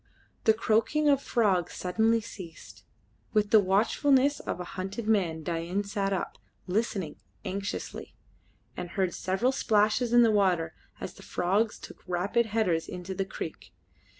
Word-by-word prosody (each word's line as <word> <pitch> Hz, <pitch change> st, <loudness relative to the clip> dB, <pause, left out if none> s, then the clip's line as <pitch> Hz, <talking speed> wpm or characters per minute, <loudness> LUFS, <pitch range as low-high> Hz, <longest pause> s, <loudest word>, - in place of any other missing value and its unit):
The 220 Hz, -, +6 dB
croaking 230 Hz, +8 st, +2 dB
of 280 Hz, -1 st, +4 dB
frogs 200 Hz, -, +1 dB
suddenly 220 Hz, +5 st, +2 dB
ceased. 160 Hz, -, -11 dB, 0.5 s
With 210 Hz, -1 st, +2 dB
the 220 Hz, -, +8 dB
watchfulness 260 Hz, +8 st, +3 dB
of -, -, -4 dB
a -, -, -3 dB
hunted 195 Hz, +4 st, -4 dB
man 175 Hz, -7 st, +1 dB
Dain 170 Hz, +4 st, -2 dB
sat 200 Hz, -1 st, -2 dB
up, 190 Hz, -, -3 dB, 0.3 s
listening 190 Hz, -5 st, -1 dB, 0.3 s
anxiously, 200 Hz, +1 st, -5 dB, 0.6 s
and 175 Hz, -, -5 dB
heard 185 Hz, -1 st, 0 dB
several 195 Hz, +8 st, 0 dB
splashes 220 Hz, 0 st, +2 dB
in 240 Hz, 0 st, +7 dB
the 225 Hz, -, +5 dB
water 180 Hz, -6 st, +2 dB, 0.3 s
as -, -, -6 dB
the -, -, -15 dB
frogs 200 Hz, +5 st, 0 dB
took -, -, -12 dB
rapid 195 Hz, +6 st, +1 dB
headers 205 Hz, -7 st, +1 dB
into 180 Hz, +1 st, -6 dB
the 195 Hz, 0 st, -2 dB
creek. 170 Hz, -4 st, -7 dB
200 Hz, 145 wpm, -28 LUFS, 180-225 Hz, 0.6 s, the